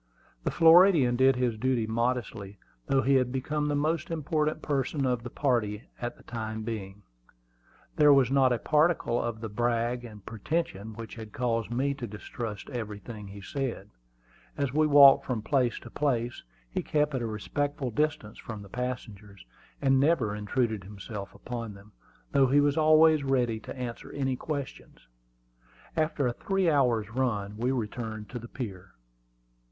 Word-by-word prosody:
The - - 0
Floridian 165 -6 +6
did 130 +1 +4
his 125 -3 -1
duty 125 -2 +1
modestly, 115 -3 -2 0.3
though 135 -1 +2
he 135 +3 +3
had 130 -2 +3
become 150 +3 -1
the 145 - 0
most 155 +2 0
important 155 -1 -1
person 140 0 -1
of 125 -2 0
the 120 - -7
party 115 -6 0 0.2
for 120 - -2
the - - -19
time 110 -2 -5
being. 105 -3 -6 0.9
There 150 -1 +7
was 135 -3 +5
not 135 -2 +4
a 120 - +2
particle 155 -3 +2
of 115 -2 -4
the 115 - -3
"brag" 120 +2 -1
and 105 -4 -11
pretension 110 - -3
which 115 0 -8
had 110 -2 -9
caused 115 -3 -1
me 135 +4 0
to 130 -4 -6
distrust 105 0 -6
everything 105 -2 -6
he 100 +1 -10
said. 115 -3 -4 0.7
As 140 -2 -1
we 155 +1 +3
walked 140 -2 +8
from 115 -5 -3
place 130 -3 +1
to 120 - -11
place 120 -5 -1 0.3
he - - -3
kept 150 -1 0
at 130 - -1
a 115 - -2
respectful 135 +5 -2
distance 130 -4 -1
from 110 -3 -7
the 100 - -13
passengers, 105 - -6 0.4
and 135 -1 +4
never 135 -8 +2
intruded 110 0 -1
himself 100 +1 -8
upon 115 -4 -6
them, 100 +2 -16 0.4
though 135 -1 +4
he 140 +3 +4
was 145 0 +3
always 155 -1 +5
ready 125 -5 +1
to 110 - -9
answer 120 -2 -6
any 135 -2 -1
questions. 140 - -6 0.9
After 155 -3 0
a 120 - +1
three 195 +3 +1
hours' 120 -7 +2
run 105 -5 -1
we 120 +4 -1
returned 110 -3 -4
to 125 - -5
the 120 - -9
pier. 100 -8 -7
125 Hz, 165 wpm, -28 LUFS, 110-140 Hz, 0.9 s, walked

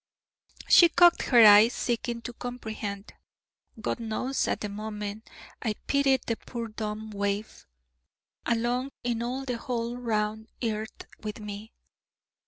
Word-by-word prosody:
She 345 - +8
cocked 345 +1 +5
her 240 -4 +7
eyes, 210 +3 +8
seeking 235 -1 -2
to 245 - -6
comprehend. 220 -4 -6 0.7
God 230 - -2
knows, 230 +4 -2
at - - -1
that 210 - -3
moment 210 0 -6 0.3
I 220 -3 -1
pitied 275 -2 +2
the 230 - -1
poor 235 -2 -6
dumb 215 0 -5
waif, 200 - -3 0.8
alone 240 +3 0
in 240 -1 -1
all 255 +3 -3
the 245 -3 -3
whole 240 0 -3
round 220 -2 -2 0.2
earth 220 0 -3 0.2
with 210 +1 -6
me. 210 +1 -8
225 Hz, 130 wpm, -28 LUFS, 215-245 Hz, 0.8 s, She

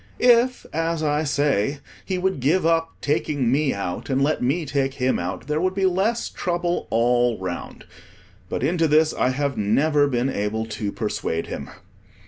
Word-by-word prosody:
If, 245 +1 +4
as 165 0 -1
I 150 0 +1
say, 140 -3 +1 0.3
he 185 - -2
would 190 -4 0
give 155 +8 +2
up 165 0 +1
taking 145 -4 0
me 140 +1 +2
out, 100 +2 -4
and 135 0 +1
let 145 +3 +1
me 145 +7 0
take 135 -1 -1
him 130 -1 +1
out, 90 +2 -4
there 150 +2 -1
would 185 +1 0
be 195 -1 +1
less 195 +6 +1
trouble 175 0 -2
all 120 0 +2
round. 90 -2 -6 0.6
But - - -3
into 165 +3 +2
this 155 +1 +3
I - - +1
have 140 0 -1
never 145 +8 +3
been 130 0 0
able 105 +1 -2
to 110 -2 -4
persuade 100 -7 -2
him. - - -6
145 Hz, 170 wpm, -23 LUFS, 120-165 Hz, 0.6 s, If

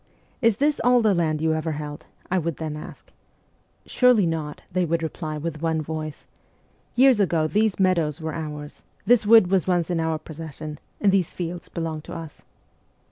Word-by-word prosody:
" - - -37
Is 225 -4 +3
this 290 +2 +1
all 245 -1 +4
the 215 -2 +4
land 155 -3 0
you 160 0 +2
ever 160 0 -2
held 150 0 -7
?" - - -29
I 190 - +3
would 165 -3 -3
then 155 -2 -4
ask. 150 - -11 0.7
"Surely 250 -6 +4
not," 160 -3 -3
they 185 +1 +1
would 165 0 0
reply 155 -1 -4
with 155 0 -5
one 165 -1 0
voice; 155 0 -5 0.7
"years 255 -2 +5
ago 170 -5 +2
these 210 +5 +1
meadows 170 -5 +2
were 160 -1 -4
ours; 150 -2 -6 0.2
this 225 -1 +4
wood 220 -5 +7
was 190 -3 +2
once 175 -1 +1
in 170 - 0
our 160 -1 0
possession; 155 -1 -8 0.2
and 200 - +4
these 190 -4 +2
fields 175 0 -6
belonged 160 -2 -4
to - - -8
us." 165 -3 -8
165 Hz, 190 wpm, -24 LUFS, 155-190 Hz, 0.7 s, wood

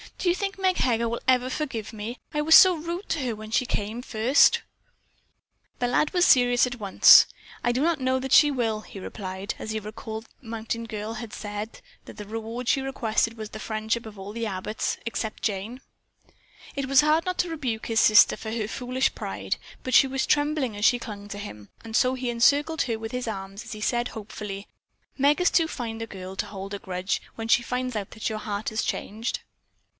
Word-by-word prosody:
Do 360 - 0
you 350 - +3
think 390 0 -3
Meg 375 -1 +1
Heger 235 -2 +1
will 235 - -3
ever 255 0 +3
forgive 250 -7 -4
me? 220 +3 -6 0.2
I 300 - 0
was 320 +2 +6
so 370 -1 +9
rude 340 +4 -5
to 325 - 0
her 250 -5 -2
when 215 0 -9
she 255 - +2
first 230 +4 +2
came." - - -1 1.1
The 245 - 0
lad 295 +5 +2
was 355 -1 +3
serious 245 -1 +5
at 245 -1 -7
once. 200 -2 +8 0.4
"I 240 - +2
do 250 +2 0
not 330 -1 +2
know 260 0 +1
that 265 0 -5
she 295 +1 +7
will," 225 -5 -1
he 200 - -11
replied 190 +1 -5
as 220 - -5
he 220 - -2
recalled 220 +1 -7
that - - -29
the 245 - -16
mountain 230 +1 -4
girl 215 0 -5
had 220 -1 -7
said 210 +1 -6 0.2
the 210 -1 -9
reward 225 +3 -5
she 270 - +3
requested 230 -4 0
was 215 -1 -6
the 215 - -7
friendship 220 +2 -2
of 210 -1 -11
all 195 +1 -7
the 230 +1 -3
Abbotts 205 +2 -3
except 220 -2 -4
Jane. 215 +5 -3 0.9
It 275 -1 -2
was 270 0 +6
hard 305 +2 +2
not 365 -1 -2
to 360 - +1
rebuke 255 -9 -3
his 225 -1 +2
sister 215 0 +6
for 220 - -6
her 220 -2 -2
foolish 255 +3 -1
pride, - - -3 0.3
but 255 - -4
she 270 - +7
was 265 0 -1
trembling 290 -5 +1
as 205 +1 -1
she 245 - +5
clung 205 -4 -8
to 205 - -6
him, 105 - -9
and 225 -1 -6
so 255 +1 +3
he 255 -1 -3
encircled 285 +7 +3
her 230 -3 -2
with 225 0 -6
his 250 -1 -3
arm 195 -3 -5
as 200 - -9
he 215 -1 -7
said 240 +2 0
hopefully: 210 -2 -7 0.5
"Meg 290 +5 +3
is 360 - +4
too 330 -2 +3
fine 230 -7 -5
a 225 - -4
girl 190 -2 -8
to - - -3
hold 195 0 -7
a 200 - -4
grudge 185 0 -2
when 225 0 -5
she 240 - +5
finds 250 0 -3
out 205 -2 -4
that 220 - -3
your 215 -1 -4
heart 210 0 -3
has 220 0 -1
changed." 220 +4 -3
230 Hz, 215 wpm, -26 LUFS, 215-260 Hz, 1.1 s, so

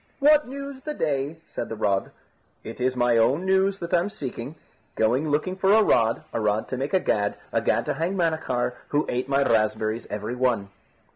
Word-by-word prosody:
"What 295 0 +5
news 275 0 -7
the 300 +2 -5
day?" 145 0 -1
said - - -5
the 115 - -4
rod. 100 -3 0 0.5
"It 115 +3 -8
is 130 0 +1
my 120 -1 +3
own 135 +10 +2
news 190 +1 +2
that 170 -1 -6
I'm 175 +3 +2
seeking. 135 - -6 0.4
Going 125 +8 +1
looking 150 +6 0
for 190 +1 +2
a 220 0 +6
rod, 115 - +2
a - - -1
rod 105 0 0
to 130 - -3
make 135 +8 -1
a - - +5
gad, 105 - 0 0.2
a - - +2
gad - - +1
to - - -1
hang 165 +6 -2
Manachar, 160 -9 0
who 150 +1 0
ate 125 +2 -2
my 140 0 +3
raspberries 110 -1 0
every 105 +3 -4
one." 125 -6 0
135 Hz, 200 wpm, -25 LUFS, 115-185 Hz, 0.5 s, a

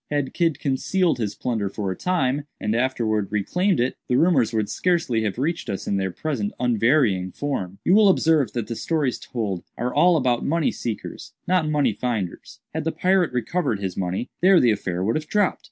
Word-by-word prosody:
Had 145 -2 -1
Kidd 165 -4 +1
concealed 160 +5 0
his 105 -3 -2
plunder 110 -5 -2
for 100 -1 -3
a - - -3
time, 145 - -1
and 105 +1 -1
afterwards 115 -5 0
reclaimed 180 - +1
it, 125 +2 0
the 125 - +1
rumors 140 -10 +3
would 110 -2 0
scarcely 145 - 0
have 105 -1 -2
reached 165 +6 -2
us 95 - -4
in 100 - 0
their 95 -1 -1
present 110 - -3
unvarying 115 -5 +2
form. 100 -10 -4
You 180 - +4
will 210 0 +6
observe 160 - +3
that 120 -3 -2
the 115 - -5
stories 145 -2 -1
told 100 -7 -4
are 125 +2 -2
all 175 -1 +5
about 125 -4 +1
money 165 0 +1
seekers, 115 -3 -6
not 180 -3 +2
about 155 - -1
money 145 -2 +2
finders. 110 -8 -4
Had 160 0 -2
the 165 - +1
pirate 185 -1 +2
recovered 125 - -1
his 95 -3 -4
money, 95 +5 -2
there 185 0 +6
the 120 - +4
affair 95 -3 -2
would 110 +4 0
have 155 0 -6
dropped. 205 +1 +1
125 Hz, 200 wpm, -23 LUFS, 105-160 Hz, -, will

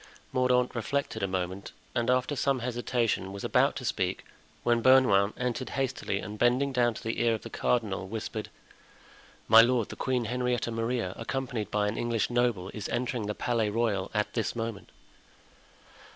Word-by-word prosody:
Mordaunt 125 -1 +2
reflected 135 +4 -2
a 100 - +1
moment 95 +1 -4 0.2
and, 120 0 0
after 130 +3 +2
some 140 0 +1
hesitation, 120 -4 -1
was 100 0 -7
about - - +3
to - - -5
speak, - - -1 0.4
when 120 -1 +2
Bernouin 115 -6 +5
entered 125 0 -2
hastily 130 -6 -1
and 105 +2 -6
bending 130 +3 +2
down 120 -2 +2
to - - -8
the 115 +1 -2
ear 115 -1 +3
of 110 - -8
the - - -8
cardinal, 105 -6 0
whispered: 110 +1 -5 1.0
"My 110 +1 +9
lord, 120 -2 +2
the - - -7
Queen 125 -2 -1
Henrietta 125 0 -1
Maria, 115 -4 -1
accompanied 115 -3 -3
by 105 -1 +1
an 105 - -2
English 120 -1 0
noble, 120 -6 +1
is 105 - -5
entering 120 -3 -2
the 105 - -2
Palais 115 -3 0
Royal 105 -3 0
at 105 0 0
this 115 0 -1
moment." 115 -3 -4
115 Hz, 165 wpm, -29 LUFS, 105-125 Hz, 1.0 s, My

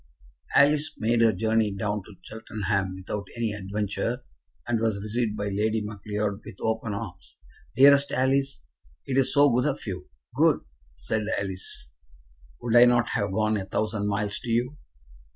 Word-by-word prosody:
Alice 150 +2 +4
made 115 +1 +1
her 115 -1 +6
journey 110 +1 +1
down 100 +1 -2
to 105 +1 -14
Cheltenham 100 -4 -3
without 95 +1 -5
any 115 -2 -1
adventure, 105 +5 -3 0.4
and 115 -2 +1
was 110 -3 0
received 110 +1 -2
by 100 0 -2
Lady 110 +3 0
Macleod 105 0 -3
with - - -10
open 110 -1 -1
arms. 105 -4 -8 0.4
"Dearest 140 +1 +6
Alice, 135 - +1 0.4
it 135 - -2
is 130 0 +2
so 145 0 +5
good 125 +3 +2
of 145 - -3
you." 95 -3 -6 0.2
"Good!" - - +3 0.3
said 105 - -3
Alice, 95 -10 -5 0.7
"would 120 -1 -1
I 120 0 +9
not 120 -2 +3
have 100 -1 -1
gone 110 +1 +1
a 95 - -4
thousand 105 +1 -1
miles 105 0 -1
to 120 - -7
you?" 120 +5 0
110 Hz, 155 wpm, -26 LUFS, 100-120 Hz, 0.7 s, I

